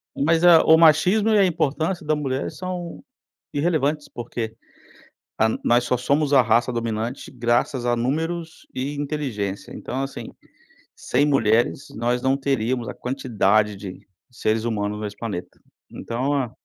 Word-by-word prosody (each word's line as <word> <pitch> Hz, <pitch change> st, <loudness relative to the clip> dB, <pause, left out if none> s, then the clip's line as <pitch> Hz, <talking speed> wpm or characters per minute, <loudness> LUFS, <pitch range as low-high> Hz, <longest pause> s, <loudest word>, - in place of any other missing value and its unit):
Mas 165 Hz, +4 st, +2 dB
é, 175 Hz, -2 st, +8 dB
o 160 Hz, -, +6 dB
machismo 180 Hz, +7 st, +4 dB
e 215 Hz, -, +4 dB
a 195 Hz, -, +5 dB
importância 165 Hz, 0 st, -1 dB
da 155 Hz, +1 st, +2 dB
mulher 135 Hz, -2 st, -2 dB
são 180 Hz, -2 st, -6 dB, 0.5 s
irrelevantes, 150 Hz, -1 st, 0 dB
porque, 115 Hz, -2 st, -5 dB, 0.8 s
ah, 110 Hz, -, +5 dB, 0.2 s
nós 120 Hz, +1 st, +3 dB
só 125 Hz, -, +1 dB
somos 140 Hz, +4 st, +1 dB
a 135 Hz, -, +7 dB
raça 115 Hz, +1 st, +2 dB
dominante 115 Hz, +1 st, -3 dB
graças 120 Hz, +1 st, 0 dB
a 120 Hz, 0 st, +2 dB
números 160 Hz, +7 st, -3 dB
e 135 Hz, +3 st, -3 dB
inteligência. 135 Hz, -10 st, -4 dB
Então, 130 Hz, +2 st, -4 dB
assim, 135 Hz, -, -6 dB, 0.7 s
sem 140 Hz, +4 st, +1 dB
mulheres, 120 Hz, +1 st, +2 dB
nós 120 Hz, +2 st, 0 dB
não 135 Hz, +1 st, +2 dB
teríamos 130 Hz, -3 st, -1 dB
a -, -, -5 dB
quantidade 110 Hz, -5 st, +1 dB
de 95 Hz, -1 st, -9 dB, 0.2 s
seres 110 Hz, -2 st, -1 dB
humanos 105 Hz, -2 st, -2 dB
nesse 105 Hz, -1 st, -5 dB
planeta. 90 Hz, -6 st, -6 dB, 0.3 s
Então 125 Hz, +5 st, -3 dB
a 130 Hz, -5 st, -1 dB
130 Hz, 145 wpm, -23 LUFS, 115-150 Hz, 0.8 s, é